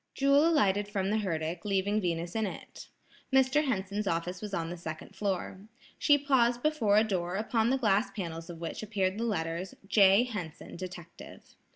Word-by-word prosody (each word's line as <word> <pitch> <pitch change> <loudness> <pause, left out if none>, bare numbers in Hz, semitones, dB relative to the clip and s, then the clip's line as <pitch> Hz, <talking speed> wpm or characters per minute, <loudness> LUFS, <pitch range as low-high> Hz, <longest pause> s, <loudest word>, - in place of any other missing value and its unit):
Jewel 280 +3 +4
alighted 205 - +2
from 195 -1 -1
the 220 - +1
herdic, 165 -3 -3
leaving 205 +1 0
Venus 170 -1 -2
in 220 -2 0
it. - - -9 0.4
Mr. 265 +3 +3
Henson's 205 -4 -2
office 175 +2 -2
was 210 -1 -6
on 170 -3 -2
the - - -4
second 165 +3 -8
floor. 190 -1 -2 0.4
She 290 - +5
paused 245 -4 +2
before 265 -10 +2
a 215 - +6
door 180 -4 -2
upon 225 +2 +1
the 265 - +2
glass 210 -3 +2
panels 165 -4 -6
of 170 -1 -8
which 165 -1 -5
appeared 200 -2 -1
the 230 - -1
letters: 170 -3 -3
"J. 195 +1 +5
Henson, 205 -11 -7
Detective." 175 -2 -10
200 Hz, 175 wpm, -30 LUFS, 175-225 Hz, 0.4 s, a